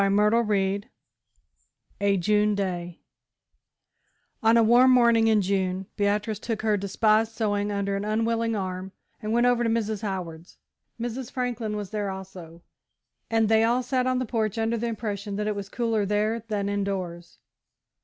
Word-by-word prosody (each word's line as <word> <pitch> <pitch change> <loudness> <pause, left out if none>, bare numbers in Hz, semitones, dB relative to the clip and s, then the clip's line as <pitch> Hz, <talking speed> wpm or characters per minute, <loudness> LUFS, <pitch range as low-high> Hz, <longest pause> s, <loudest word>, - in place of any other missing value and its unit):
CHAPTER 210 +4 +3
XI 200 0 +1 1.2
A 200 -1 +3
JUNE 210 +3 +2
DAY 175 -3 -4 1.4
On 225 0 +5
a 230 - +5
warm 240 +3 +6
morning 235 -3 +5
in 215 -2 +3
June, 190 0 -1
Beatrice 210 +1 0
took 225 -2 -4
her 215 -1 +2
despised 215 +3 +1
sewing 205 -2 -1
under 200 -1 -1
an 200 - -2
unwilling 225 +1 0
arm 185 -1 -4 0.3
and 215 -1 -3
went 240 +2 +3
over 245 -1 +3
to 230 - +1
Mrs. 220 -2 -1
Howard's. 180 -5 -6 0.4
Mrs. 240 +1 -4
Franklin 240 -4 -3
was 205 -3 -6
there 205 -2 -2
also, 185 -3 -9 0.7
and 225 -1 +2
they 220 0 +4
all 240 +3 +2
sat 255 0 0
on 255 0 +1
the 255 - -1
porch, 220 -2 -1
under 225 +1 0
the 235 +1 -2
impression 205 -3 -4
that 210 +1 -2
it 210 0 -1
was 200 -1 -6
cooler 225 -2 0
there 210 +3 0
than 205 -2 -2
indoors. 190 -4 -3
210 Hz, 160 wpm, -26 LUFS, 195-225 Hz, 1.4 s, warm